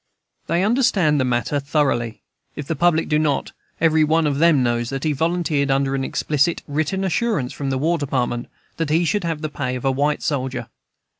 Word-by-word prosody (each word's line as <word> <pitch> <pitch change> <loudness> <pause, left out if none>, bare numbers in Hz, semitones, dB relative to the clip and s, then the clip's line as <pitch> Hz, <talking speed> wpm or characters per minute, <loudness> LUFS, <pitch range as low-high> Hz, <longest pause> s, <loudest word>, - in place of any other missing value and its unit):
They 170 +3 +1
understand 200 - +2
the - - +2
matter 125 +3 0
thoroughly, 135 -6 -1 0.3
if 150 - -5
the 165 - -2
public 165 +1 +2
do 150 -1 +2
not 150 -3 0 0.3
Every 160 -1 +4
one 160 +1 +2
of 145 -1 0
them 160 -5 +4
knows 120 -1 0
that 135 0 -4
he 155 - +1
volunteered 160 -2 0
under 135 0 +1
an 135 -1 -1
explicit 150 +4 0
written 155 +6 -1
assurance 190 - 0
from 140 -1 -4
the 135 - 0
War 165 +5 +1
Department 125 -4 -2 0.3
that 165 -2 -1
he 165 +3 +2
should 205 +3 0
have 165 -2 -2
the - - 0
pay 130 -4 -3
of 125 - -6
a 135 - +3
white 145 +3 0
soldier. 130 -3 -2
150 Hz, 200 wpm, -21 LUFS, 135-165 Hz, 0.3 s, Every